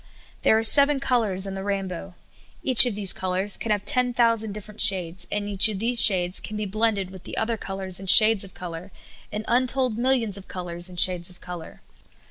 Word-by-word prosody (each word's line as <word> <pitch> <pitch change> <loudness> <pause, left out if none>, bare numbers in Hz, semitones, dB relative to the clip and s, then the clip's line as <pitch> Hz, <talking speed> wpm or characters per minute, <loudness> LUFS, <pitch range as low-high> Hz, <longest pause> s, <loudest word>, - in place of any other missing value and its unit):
There 220 - +2
are 225 - -2
seven 280 +4 +3
colors 220 -8 0
in 195 - -6
the 195 - -7
rainbow. 195 -2 -6 0.5
Each 250 -2 +8
of 230 - -5
these 200 -2 +1
colors 190 +2 -1
can 230 - -6
have 205 -1 -3
ten 250 -3 +1
thousand 230 -3 0
different 210 +1 -6
shades, 180 -2 +3
and 205 0 -4
each 205 +1 +4
of 210 - -6
these 235 +3 +1
shades 180 -3 +2
can 215 - -9
be 210 - -5
blended 205 -2 -3
with 190 -1 -14
the - - -10
other 225 +1 -3
col 195 -2 -9
ors 185 -1 -7
and 195 -1 -5
vShades 215 +1 +7
of 190 - -14
color 180 +1 -10 0.4
in 210 +1 -7
untold 250 -1 -1
millions 240 -5 -1
of 195 - -14
colors 175 -1 -5
and 180 -1 -6
shades 180 -1 +1
of 180 - -16
color. 175 -2 -12
205 Hz, 210 wpm, -22 LUFS, 185-225 Hz, 0.5 s, Each